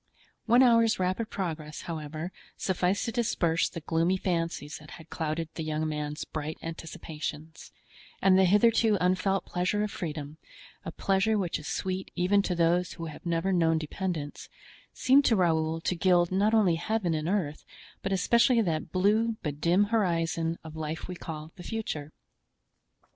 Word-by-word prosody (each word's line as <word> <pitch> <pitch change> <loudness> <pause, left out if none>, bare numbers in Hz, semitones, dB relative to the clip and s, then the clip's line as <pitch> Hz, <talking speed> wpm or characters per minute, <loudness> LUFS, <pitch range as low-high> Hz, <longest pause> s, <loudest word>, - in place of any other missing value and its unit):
One 240 +3 +6
hour's 230 -2 +5
rapid 185 +5 -1
progress, 155 -5 -4
however, 155 +1 -5 0.3
sufficed 185 +1 0
to 230 - -2
disperse 175 -9 +1
the 165 - -7
gloomy 165 +4 +1
fancies 165 -5 -2
that 150 0 -14
had 160 -1 -15
clouded 160 0 -2
the 160 - -4
young 155 0 -1
man's 150 0 -3
bright 155 0 -5
anticipations; 160 -1 -7 0.5
and 195 -1 +5
the 190 0 +5
hitherto 215 +2 +4
unfelt 185 +2 +1
pleasure 180 +4 0
of 210 - -2
freedom—a 150 -3 -8
pleasure 200 +3 +1
which 180 -4 -1
is 150 - -9
sweet 185 0 -3
even 195 +3 +3
to 185 -2 -2
those 175 +1 +2
who 165 - -6
have - - -10
never 170 +3 +1
known 165 -2 +3
dependence—seemed 175 - -1
to 230 - +4
Raoul 160 -3 +1
to 180 - 0
gild 175 0 +3
not 205 +4 +3
only 190 -7 +4
Heaven 210 -2 -1
and 155 +1 -1
earth, 165 -7 -1 0.4
but 195 - -3
especially 235 +6 +4
that 165 -8 -1
blue 215 +5 +2
but 150 -2 -4
dim 175 +4 +4
horizon 165 -5 +1
of 160 -1 -9
life 160 0 -4
we 180 - -5
call 160 -3 -7
the 175 - -9
future. 160 -10 -4
175 Hz, 155 wpm, -28 LUFS, 160-195 Hz, 0.5 s, One